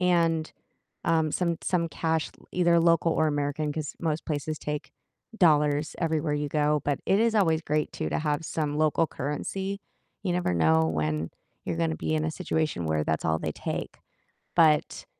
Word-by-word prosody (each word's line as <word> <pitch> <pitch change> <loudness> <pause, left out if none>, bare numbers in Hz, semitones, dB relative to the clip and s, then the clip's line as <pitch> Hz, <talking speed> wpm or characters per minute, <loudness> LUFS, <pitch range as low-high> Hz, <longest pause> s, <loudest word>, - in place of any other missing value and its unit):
and, 165 -3 +2 0.5
um, 160 -2 +2
some 170 -1 0
some 170 -2 0
cash, 160 -1 -1
l - - -21
either 170 -1 +3
local 165 0 +3
or 160 - +2
American, 145 +1 -1
'cause 150 -1 -5
most 160 -2 -2
places 155 0 -2
take 150 0 -5 0.5
dollars 150 -3 +3
everywhere 160 -2 0
you 145 0 -1
go, 150 0 +2
but 145 -1 0
it 195 - +3
is 225 0 +2
always 165 -6 +3
great 150 -1 -1
too 80 - -3
to - - -1
have 150 0 -1
some 150 -2 -2
local 155 +1 +3
currency, 190 +9 -3 0.4
you 185 - 0
never 175 - 0
know 80 -1 +4
when 75 0 -1 0.4
you're 85 - -2
gonna 80 -1 0
be 80 0 -2
in 75 - 0
a 80 - -1
situation 155 - -1
where 80 -1 +1
that's 80 +1 -1
all 80 0 +2
they - - -2
take, - - -5 0.6
but 155 -3 +3
155 Hz, 180 wpm, -27 LUFS, 145-165 Hz, 0.6 s, know